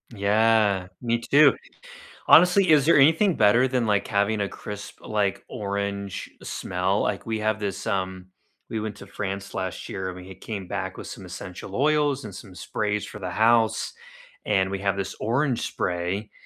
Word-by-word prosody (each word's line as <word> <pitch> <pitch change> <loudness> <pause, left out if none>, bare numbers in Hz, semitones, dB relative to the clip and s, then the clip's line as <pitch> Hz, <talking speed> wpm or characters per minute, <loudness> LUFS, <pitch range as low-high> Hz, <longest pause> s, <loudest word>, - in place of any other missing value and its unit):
Yeah, 105 -2 +3
me 120 -1 0
too, 145 +6 +5 0.7
honestly, 180 -1 +6
is 145 -3 +5
there 165 - +6
anything 165 +6 +5
better 115 +5 +4
than 125 -2 0
like 105 -2 +1
having 100 +1 +1
a 100 - -1
crisp, 105 -1 -8
like 105 -2 -1
orange 100 -1 -4
smell? 95 +2 -1
Like 105 +2 -2
we 110 - -1
have 110 0 0
this 100 -2 -4
um, 95 -3 -2 0.4
we 110 - -3
went 105 -1 -4
to 100 - -11
France 100 0 -5
last 95 -1 -4
year 95 -1 -4
and 90 0 -6
we 90 0 -10
had 95 - -12
came 100 -4 -6
back - - -4
with - - -8
some - - -9
essential 95 +2 -8
oils 145 -2 +2
and 105 - -8
some 95 -1 -11
sprays 105 +2 -2
for - - -9
the 90 -2 -4
house, 110 +3 +2 0.5
and 95 -2 +1
we 100 - -3
have 100 0 0
this 100 - -3
orange 125 +3 0
spray 90 +4 -2
105 Hz, 175 wpm, -25 LUFS, 95-115 Hz, 0.7 s, honestly